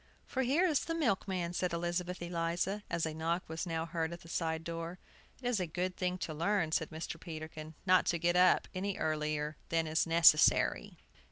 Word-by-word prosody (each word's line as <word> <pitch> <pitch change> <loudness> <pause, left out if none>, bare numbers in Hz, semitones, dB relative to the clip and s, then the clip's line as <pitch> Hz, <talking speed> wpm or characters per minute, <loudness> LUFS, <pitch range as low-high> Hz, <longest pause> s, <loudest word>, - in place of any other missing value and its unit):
"For 265 - -2
here 280 +8 +3
is 310 -6 +3
the 330 - -2
milkman!" 190 - 0
said 180 0 -1
Elizabeth 175 +1 -2
Eliza, 175 +4 -1
as 165 - 0
a 160 - -3
knock 165 +3 -2
was 160 +3 -4
now 165 -1 -2
heard 165 -1 -2
at 170 - -8
the - - -14
side 160 -1 -1
door. 165 +1 -5 0.4
"It 250 - -4
is 245 -4 +1
a 180 - -1
good 180 +3 -2
thing 180 0 -1
to 155 - -6
learn," 170 +1 0
said 160 0 0
Mr. 160 +1 -6
Peterkin, 155 -1 -8
"not 185 -1 +4
to 170 - +2
get 170 +1 +1
up 180 0 +5
any 195 +1 -2
earlier 150 -1 -1
than 165 -1 +1
is 160 +1 +1
necessary." 165 -2 +5
170 Hz, 195 wpm, -33 LUFS, 160-185 Hz, 0.4 s, up